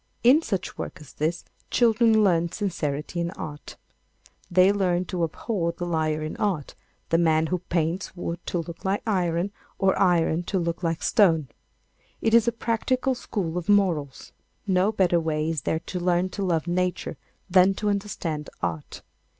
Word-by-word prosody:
In 265 Hz, +7 st, +6 dB
such 195 Hz, -, -4 dB
work -, -, -5 dB
as 150 Hz, -3 st, -14 dB
this, 160 Hz, +3 st, -2 dB, 0.2 s
children 225 Hz, -2 st, +4 dB
learn 170 Hz, -3 st, +2 dB
sincerity 165 Hz, -5 st, -3 dB
in 170 Hz, 0 st, -1 dB
art. 150 Hz, -1 st, -7 dB, 0.7 s
They 185 Hz, +1 st, +5 dB
learn 185 Hz, -3 st, +1 dB
to 175 Hz, -1 st, -2 dB
abhor 170 Hz, +1 st, -2 dB
the 175 Hz, -, -5 dB
liar 155 Hz, -2 st, 0 dB
in 155 Hz, -, -4 dB
art—the 170 Hz, -4 st, -3 dB
man 160 Hz, -1 st, +3 dB
who 180 Hz, +3 st, -1 dB
paints 170 Hz, +1 st, -2 dB
wood 175 Hz, -1 st, -5 dB
to -, -, -1 dB
look 170 Hz, 0 st, -6 dB
like 195 Hz, +1 st, 0 dB
iron, 180 Hz, -3 st, 0 dB, 0.3 s
or 195 Hz, -1 st, +3 dB
iron 170 Hz, -3 st, +3 dB
to 195 Hz, -, -1 dB
look 170 Hz, -1 st, -2 dB
like 165 Hz, -2 st, -1 dB
stone. 165 Hz, -, +3 dB, 0.7 s
It 225 Hz, -, 0 dB
is 230 Hz, 0 st, +6 dB
a -, -, +4 dB
practical 245 Hz, +3 st, 0 dB
school 180 Hz, -8 st, -3 dB
of 175 Hz, -, -9 dB
morals. 170 Hz, -9 st, +1 dB, 0.3 s
No 190 Hz, +1 st, +2 dB
better 180 Hz, -5 st, +2 dB
way 155 Hz, -1 st, -1 dB
is 160 Hz, -4 st, -2 dB
there 160 Hz, +5 st, -1 dB
to 180 Hz, -, -5 dB
learn 175 Hz, +1 st, +1 dB
to 200 Hz, +2 st, -4 dB
love 165 Hz, -4 st, 0 dB
Nature 180 Hz, -1 st, -1 dB, 0.3 s
than 190 Hz, +1 st, +5 dB
to 210 Hz, -, -3 dB
understand 185 Hz, -7 st, -3 dB
Art. 80 Hz, -3 st, -4 dB
175 Hz, 165 wpm, -25 LUFS, 165-200 Hz, 0.7 s, In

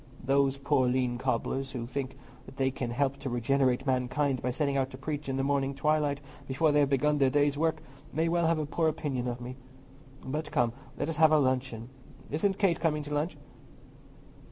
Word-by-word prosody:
Those 135 Hz, +1 st, +2 dB
poor 135 Hz, -2 st, +2 dB
lean 125 Hz, -1 st, 0 dB
cobblers, 130 Hz, +1 st, -1 dB
who 120 Hz, -3 st, -3 dB
think 130 Hz, +2 st, -4 dB, 0.4 s
they 135 Hz, -1 st, +1 dB
can 125 Hz, -2 st, -4 dB
help 135 Hz, +3 st, 0 dB
to 135 Hz, -1 st, -5 dB
regenerate 130 Hz, +1 st, +1 dB
mankind 130 Hz, +1 st, 0 dB
by 125 Hz, -, -1 dB
setting 140 Hz, +2 st, 0 dB
out 135 Hz, -1 st, +1 dB
to 130 Hz, -, -9 dB
preach 145 Hz, +1 st, -4 dB
in 135 Hz, -, -1 dB
the 135 Hz, -, 0 dB
morning 140 Hz, -1 st, 0 dB
twilight 150 Hz, -1 st, +1 dB, 0.3 s
before 150 Hz, +4 st, +2 dB
they 145 Hz, 0 st, +4 dB
begin 145 Hz, +2 st, +2 dB
their 135 Hz, -1 st, +4 dB
day's 145 Hz, +1 st, +2 dB
work, 160 Hz, +2 st, 0 dB, 0.3 s
may 160 Hz, +3 st, +1 dB
well 170 Hz, 0 st, +2 dB
have 165 Hz, 0 st, +2 dB
a 155 Hz, -, -1 dB
poor 160 Hz, +2 st, 0 dB
opinion 145 Hz, -5 st, -2 dB
of 120 Hz, 0 st, -3 dB
me. 125 Hz, +1 st, -7 dB, 0.7 s
But 150 Hz, +3 st, -3 dB
come, 120 Hz, -1 st, +2 dB, 0.2 s
let -, -, -1 dB
us 165 Hz, -2 st, -3 dB
have 160 Hz, -1 st, +6 dB
our 155 Hz, -, +6 dB
luncheon. 130 Hz, -3 st, -1 dB, 0.4 s
Isn't 190 Hz, +6 st, +1 dB
Kate 190 Hz, -5 st, +2 dB
coming 150 Hz, -2 st, 0 dB
to 150 Hz, 0 st, -6 dB
lunch?" 150 Hz, +4 st, -1 dB
140 Hz, 195 wpm, -29 LUFS, 130-150 Hz, 0.7 s, have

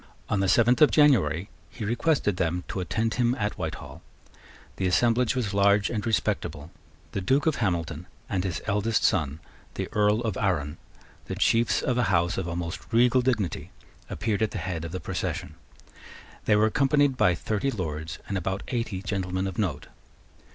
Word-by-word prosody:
On 105 Hz, -, +1 dB
the 95 Hz, -, +1 dB
seventh 120 Hz, +5 st, +4 dB
of 150 Hz, -, +8 dB
January 100 Hz, -, +3 dB, 0.2 s
he 110 Hz, -, -6 dB
requested 120 Hz, -, +1 dB
them 85 Hz, +1 st, -1 dB
to -, -, -3 dB
attend 110 Hz, +6 st, -1 dB
him 120 Hz, 0 st, +1 dB
at 105 Hz, -3 st, -2 dB
Whitehall. -, -, -6 dB, 0.8 s
The 95 Hz, -, 0 dB
assemblage 120 Hz, +6 st, +2 dB
was 110 Hz, -6 st, -1 dB
large 100 Hz, 0 st, +3 dB
and 105 Hz, -3 st, -2 dB
respectable. 90 Hz, -7 st, -1 dB, 0.4 s
The 100 Hz, -, -3 dB
Duke 135 Hz, +10 st, +2 dB
of 160 Hz, -2 st, +2 dB
Hamilton 85 Hz, -5 st, -2 dB, 0.2 s
and 95 Hz, -3 st, -1 dB
his 90 Hz, -4 st, -3 dB
eldest 105 Hz, +2 st, +1 dB
son, 80 Hz, -5 st, +1 dB, 0.4 s
the -, -, -3 dB
Earl 105 Hz, +1 st, +3 dB
of 110 Hz, -5 st, -2 dB
Arran, 80 Hz, -6 st, -1 dB, 0.5 s
the -, -, -5 dB
chiefs 115 Hz, +1 st, +2 dB
of 125 Hz, -1 st, 0 dB
a 125 Hz, -, +3 dB
house 85 Hz, +1 st, +2 dB
of 90 Hz, -2 st, -3 dB
almost 85 Hz, +1 st, -5 dB
regal 125 Hz, +2 st, +4 dB
dignity, 115 Hz, -, -1 dB, 0.4 s
appeared 110 Hz, -3 st, -2 dB
at 110 Hz, -, +2 dB
the -, -, -6 dB
head 85 Hz, -3 st, -4 dB
of 80 Hz, -, -6 dB
the 95 Hz, -, -4 dB
procession. -, -, -4 dB, 0.9 s
They 105 Hz, -, +4 dB
were 105 Hz, +1 st, +4 dB
accompanied 140 Hz, +2 st, +2 dB
by 90 Hz, -8 st, +3 dB
thirty 110 Hz, +8 st, -1 dB
Lords 80 Hz, -, -4 dB
and 100 Hz, -1 st, -1 dB
about 95 Hz, +2 st, -3 dB
eighty 115 Hz, -6 st, -3 dB
gentlemen 95 Hz, -2 st, -2 dB
of 95 Hz, 0 st, -4 dB
note. 80 Hz, -9 st, -1 dB
100 Hz, 170 wpm, -26 LUFS, 90-115 Hz, 0.9 s, of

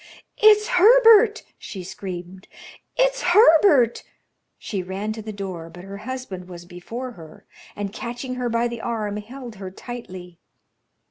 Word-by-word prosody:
"It's 425 Hz, 0 st, +6 dB
Herbert!" 445 Hz, +1 st, +6 dB, 0.2 s
she 190 Hz, -3 st, -8 dB
screamed. 185 Hz, 0 st, -8 dB, 0.5 s
"It's -, -, +2 dB
Herbert!" 320 Hz, -, +5 dB, 0.6 s
She 200 Hz, -4 st, -4 dB
ran 195 Hz, +4 st, -4 dB
to 220 Hz, -, -7 dB
the 215 Hz, 0 st, -7 dB
door, 185 Hz, -5 st, -7 dB
but 175 Hz, +2 st, -12 dB
her 195 Hz, +1 st, -8 dB
husband 210 Hz, -6 st, -7 dB
was 175 Hz, -1 st, -10 dB
before 225 Hz, +9 st, -7 dB
her, 160 Hz, -7 st, -14 dB, 0.3 s
and 205 Hz, -1 st, -5 dB
catching 245 Hz, +3 st, -6 dB
her 250 Hz, -1 st, -2 dB
by 235 Hz, +1 st, +1 dB
the 235 Hz, -1 st, -6 dB
arm, 215 Hz, -3 st, -3 dB
held 235 Hz, +1 st, -9 dB
her 190 Hz, -1 st, -7 dB
tightly. 185 Hz, -5 st, -10 dB
220 Hz, 140 wpm, -23 LUFS, 185-260 Hz, 0.6 s, It's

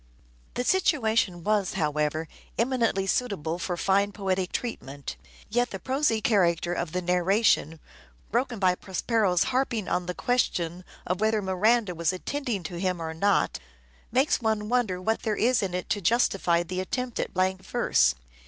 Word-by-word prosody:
The 245 Hz, -, -1 dB
situation 225 Hz, -, +1 dB
was, 210 Hz, -2 st, +1 dB
however, 150 Hz, +1 st, -1 dB, 0.3 s
eminently 230 Hz, -5 st, +1 dB
suitable 195 Hz, -7 st, -1 dB
Literary 175 Hz, -, -4 dB
for 175 Hz, -2 st, -2 dB
fine 200 Hz, +3 st, +2 dB
poetic 190 Hz, -2 st, -1 dB
treatment; 140 Hz, -, -5 dB, 0.3 s
yet 245 Hz, +3 st, +1 dB
the 195 Hz, -, -5 dB
prosy 260 Hz, 0 st, 0 dB
character 175 Hz, -5 st, +2 dB
<luaUty' -, -, -1 dB
of 170 Hz, -2 st, -5 dB
the 180 Hz, +1 st, -2 dB
narration, 180 Hz, -2 st, +2 dB, 0.5 s
broken 240 Hz, +1 st, 0 dB
by 185 Hz, -2 st, +3 dB
Prospero's 190 Hz, 0 st, +1 dB
harping 240 Hz, -6 st, 0 dB
on 180 Hz, -1 st, -1 dB
the 180 Hz, -, -3 dB
question 180 Hz, -8 st, 0 dB, 0.2 s
of 180 Hz, +2 st, -2 dB
whether 220 Hz, 0 st, +2 dB
Miranda 205 Hz, +2 st, +2 dB
was 170 Hz, -1 st, 0 dB
attending 225 Hz, +1 st, -3 dB
to 170 Hz, +1 st, -6 dB
him 180 Hz, -1 st, -1 dB
or 160 Hz, -1 st, -4 dB
not, 200 Hz, +5 st, +1 dB, 0.5 s
makes 265 Hz, +3 st, +2 dB
one 215 Hz, -2 st, 0 dB
wonder 235 Hz, -7 st, +1 dB
what 220 Hz, +5 st, -1 dB
there 215 Hz, -1 st, -1 dB
is 245 Hz, +1 st, +3 dB
in 190 Hz, -3 st, -2 dB
it 180 Hz, -, -3 dB
to 205 Hz, -, 0 dB
justify 180 Hz, -4 st, +2 dB
the 185 Hz, +2 st, -4 dB
attempt 250 Hz, +5 st, -3 dB
at -, -, -2 dB
blank 185 Hz, +1 st, 0 dB
verse. 65 Hz, -, +2 dB
195 Hz, 160 wpm, -27 LUFS, 175-230 Hz, 0.5 s, by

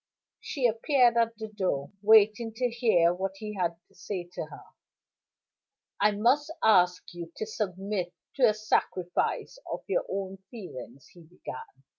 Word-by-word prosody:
She 270 Hz, -5 st, -3 dB
appeared 240 Hz, +1 st, +4 dB
at 230 Hz, -1 st, +2 dB
the 220 Hz, 0 st, -5 dB
door, 185 Hz, -10 st, -2 dB
waiting 220 Hz, +1 st, +5 dB
to 250 Hz, 0 st, 0 dB
hear 215 Hz, -8 st, +3 dB
what 190 Hz, +2 st, -3 dB
he 210 Hz, +1 st, -6 dB
had 175 Hz, -4 st, -1 dB
to -, -, -28 dB
say 180 Hz, -1 st, -5 dB
to -, -, -4 dB
her. -, -, -12 dB, 1.4 s
"I 210 Hz, -, +5 dB
must 245 Hz, +9 st, +2 dB
ask 180 Hz, -4 st, +5 dB
you 170 Hz, -1 st, -7 dB
to -, -, -3 dB
submit 195 Hz, -3 st, -3 dB, 0.3 s
to 250 Hz, -4 st, +6 dB
a 215 Hz, -, 0 dB
sacrifice 215 Hz, -, -1 dB
of -, -, -4 dB
your -, -, -1 dB
own 195 Hz, 0 st, -3 dB
feelings," 140 Hz, -, -10 dB
he 175 Hz, -, -16 dB
began. 135 Hz, -5 st, -10 dB
210 Hz, 150 wpm, -28 LUFS, 180-225 Hz, 1.4 s, to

